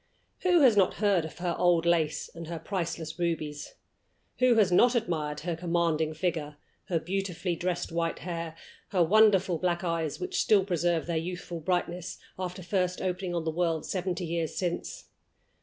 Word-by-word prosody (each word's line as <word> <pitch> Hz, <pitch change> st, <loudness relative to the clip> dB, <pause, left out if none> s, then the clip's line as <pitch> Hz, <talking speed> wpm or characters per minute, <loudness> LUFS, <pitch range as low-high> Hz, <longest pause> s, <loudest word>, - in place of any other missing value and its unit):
Who 355 Hz, -3 st, +4 dB
has 250 Hz, -6 st, +6 dB
not 195 Hz, -3 st, +3 dB
heard 200 Hz, -6 st, +2 dB
of 155 Hz, -, -9 dB
her 175 Hz, -1 st, -1 dB
old 175 Hz, -2 st, +3 dB
lace 160 Hz, -3 st, +1 dB
and 165 Hz, -1 st, -8 dB
her 170 Hz, 0 st, -4 dB
priceless 165 Hz, -2 st, -4 dB
rubies? 155 Hz, -4 st, -3 dB, 0.6 s
Who 250 Hz, -1 st, +5 dB
has 205 Hz, -5 st, +4 dB
not 240 Hz, +7 st, +5 dB
admired 155 Hz, -9 st, -1 dB
her 170 Hz, +1 st, -2 dB
commanding 165 Hz, -2 st, 0 dB
figure, 155 Hz, -3 st, -2 dB, 0.3 s
her 170 Hz, -3 st, 0 dB
beautifully 180 Hz, 0 st, -2 dB
dressed 175 Hz, 0 st, -2 dB
white 165 Hz, 0 st, -1 dB
hair, 170 Hz, -2 st, -5 dB, 0.3 s
her 180 Hz, -3 st, +2 dB
wonderful 195 Hz, -2 st, +4 dB
black 175 Hz, -1 st, 0 dB
eyes, 165 Hz, -3 st, -1 dB
which 370 Hz, +1 st, -1 dB
still 200 Hz, -3 st, +4 dB
preserve 175 Hz, -3 st, +1 dB
their 170 Hz, -1 st, -1 dB
youthful 175 Hz, 0 st, -4 dB
brightness, 175 Hz, +1 st, -2 dB, 0.2 s
after 185 Hz, 0 st, -4 dB
first 180 Hz, 0 st, 0 dB
opening 180 Hz, -1 st, -2 dB
on 170 Hz, -, -1 dB
the 160 Hz, -, 0 dB
world 165 Hz, -1 st, 0 dB
seventy 185 Hz, -1 st, -2 dB
years 165 Hz, -1 st, -2 dB
since? 175 Hz, -2 st, -3 dB
175 Hz, 165 wpm, -29 LUFS, 165-185 Hz, 0.6 s, has